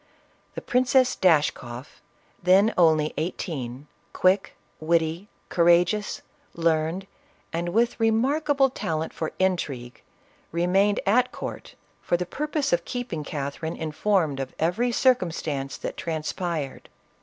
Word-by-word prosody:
The -, -, -6 dB
Princess 255 Hz, +1 st, +3 dB
Dashkoff, 145 Hz, -7 st, 0 dB, 0.4 s
then 190 Hz, +5 st, +5 dB
only 160 Hz, -3 st, +3 dB
eighteen, 145 Hz, -6 st, -4 dB, 0.3 s
quick, 190 Hz, +1 st, +2 dB, 0.2 s
witty, 165 Hz, +3 st, 0 dB, 0.2 s
courageous, 175 Hz, +4 st, +2 dB, 0.3 s
learned, 165 Hz, +2 st, 0 dB, 0.5 s
and 170 Hz, +1 st, -1 dB
with 230 Hz, +6 st, +1 dB
remarkable 270 Hz, +5 st, +2 dB
talent 160 Hz, -8 st, -3 dB
for 160 Hz, -, -3 dB
in. 190 Hz, 0 st, +3 dB, 1.0 s
remained 190 Hz, +5 st, +2 dB
at 250 Hz, +5 st, +3 dB
court -, -, -7 dB, 0.3 s
for 175 Hz, -, +1 dB
the 180 Hz, -, -3 dB
purpose 300 Hz, -, -2 dB
of 170 Hz, 0 st, +2 dB
keeping 240 Hz, -11 st, -4 dB
Catherine 145 Hz, +3 st, -4 dB
informed 160 Hz, -2 st, 0 dB
of 135 Hz, -1 st, -5 dB
every 200 Hz, +10 st, +1 dB
circumstance 165 Hz, -, 0 dB
that -, -, -6 dB
transpired. 160 Hz, -2 st, -4 dB
175 Hz, 110 wpm, -25 LUFS, 155-215 Hz, 1.0 s, then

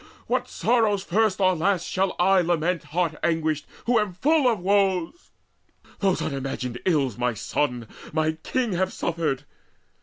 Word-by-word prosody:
what -, -, -1 dB
sorrows 220 Hz, -5 st, +1 dB
first 205 Hz, +1 st, +1 dB
or 185 Hz, -1 st, +3 dB
last 180 Hz, +1 st, +1 dB
shall 190 Hz, 0 st, 0 dB
I 190 Hz, +1 st, +4 dB
Lament 170 Hz, 0 st, 0 dB
heart 170 Hz, 0 st, -1 dB
anguished, 160 Hz, -2 st, 0 dB, 0.2 s
who 240 Hz, -1 st, +3 dB
am 210 Hz, -3 st, -1 dB
full 280 Hz, -, +3 dB
of 225 Hz, -, -1 dB
woes? 195 Hz, -, 0 dB, 0.7 s
Those 195 Hz, -2 st, +1 dB
unimagined 130 Hz, -3 st, -4 dB
ills 140 Hz, -, +1 dB
my 125 Hz, -1 st, 0 dB
sons, 120 Hz, +2 st, -2 dB, 0.3 s
my 155 Hz, 0 st, +1 dB
king 225 Hz, +9 st, -2 dB
Have 190 Hz, +1 st, 0 dB
suffered? 160 Hz, -5 st, -2 dB
180 Hz, 145 wpm, -25 LUFS, 155-200 Hz, 0.7 s, I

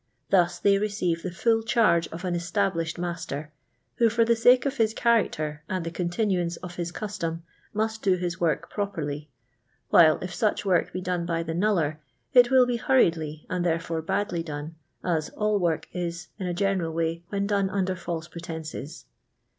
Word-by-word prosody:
Thus 175 Hz, -2 st, +4 dB
they 200 Hz, +1 st, +3 dB
receive 200 Hz, -5 st, -1 dB
the 185 Hz, -, -3 dB
full 225 Hz, +6 st, +1 dB
charge 215 Hz, -8 st, +3 dB
of 165 Hz, +3 st, -7 dB
an 180 Hz, -, -1 dB
established 175 Hz, -1 st, -1 dB
master, 170 Hz, -4 st, -4 dB, 0.5 s
who, 230 Hz, -1 st, +5 dB
for 230 Hz, +1 st, +3 dB
the 235 Hz, 0 st, +3 dB
sake 245 Hz, +3 st, +5 dB
of 275 Hz, 0 st, -1 dB
his 225 Hz, -1 st, +2 dB
character 155 Hz, -10 st, +1 dB
and 185 Hz, -2 st, -2 dB
the 165 Hz, -, -3 dB
continuance 175 Hz, 0 st, 0 dB
of 175 Hz, -1 st, -9 dB
his 175 Hz, -1 st, -3 dB
custom, 170 Hz, -6 st, -4 dB, 0.3 s
must 220 Hz, +1 st, -1 dB
do 190 Hz, -2 st, +3 dB
his 175 Hz, -1 st, -3 dB
work 160 Hz, -5 st, +1 dB
properly; 155 Hz, -8 st, -3 dB, 0.6 s
while 160 Hz, -2 st, +7 dB
if 180 Hz, 0 st, -5 dB
such 215 Hz, 0 st, 0 dB
work 185 Hz, -3 st, +2 dB
be 185 Hz, -, -4 dB
done 180 Hz, -1 st, -2 dB
by 165 Hz, -1 st, 0 dB
the 165 Hz, 0 st, -4 dB
knuller, 170 Hz, -5 st, +1 dB, 0.4 s
it 245 Hz, -1 st, +7 dB
will 260 Hz, -1 st, +6 dB
be 245 Hz, -1 st, 0 dB
hurriedly 165 Hz, -, +1 dB
and 180 Hz, -1 st, -1 dB
therefore 165 Hz, -1 st, -1 dB
badly 175 Hz, +1 st, -1 dB
done, 150 Hz, 0 st, -6 dB, 0.3 s
as 160 Hz, -4 st, 0 dB
all 210 Hz, -1 st, 0 dB
work 170 Hz, -3 st, 0 dB
is, 175 Hz, -1 st, -4 dB
in 185 Hz, -, -3 dB
a 175 Hz, -, -1 dB
general 185 Hz, -3 st, 0 dB
way, 165 Hz, +1 st, -1 dB
when 200 Hz, -1 st, -1 dB
done 200 Hz, -1 st, +1 dB
under 190 Hz, -1 st, 0 dB
false 170 Hz, -2 st, -5 dB
pretences. 160 Hz, -3 st, -7 dB
175 Hz, 180 wpm, -26 LUFS, 165-205 Hz, 0.6 s, while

